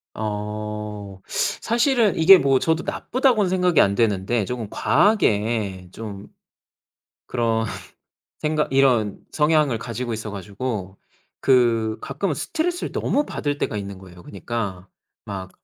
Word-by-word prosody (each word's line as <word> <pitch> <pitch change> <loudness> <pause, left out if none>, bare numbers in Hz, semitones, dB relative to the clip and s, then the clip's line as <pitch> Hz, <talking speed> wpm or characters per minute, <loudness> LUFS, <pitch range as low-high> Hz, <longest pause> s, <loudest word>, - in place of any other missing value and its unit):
어 105 -1 -5 0.4
사실은 235 -2 +2
이게 185 +4 +9
뭐 135 -1 +3
저도 160 0 0
나쁘다고는 245 -7 +1
생각이 180 -3 +2
안 100 - +5
되는데 105 0 +1
좀 120 -4 -4
과하게 105 - +1
좀 105 -2 -8 1.0
그런 115 -2 0 0.7
생각 150 -2 -1
이런 125 -7 +3
성향을 150 -5 +2
가지고 120 +1 -4
있어 110 -1 -4
가지고 100 0 -5 0.4
그 115 -4 +3
가끔은 145 +4 -2
스트레스를 345 - -2
너무 295 - 0
받을 145 -1 -3
때가 105 - -2
있는 100 -1 -6
거예요. 90 -2 -14
그니까 100 -2 -5 0.4
막 95 -2 -6
115 Hz, 255 characters per minute, -23 LUFS, 100-150 Hz, 1.0 s, 이게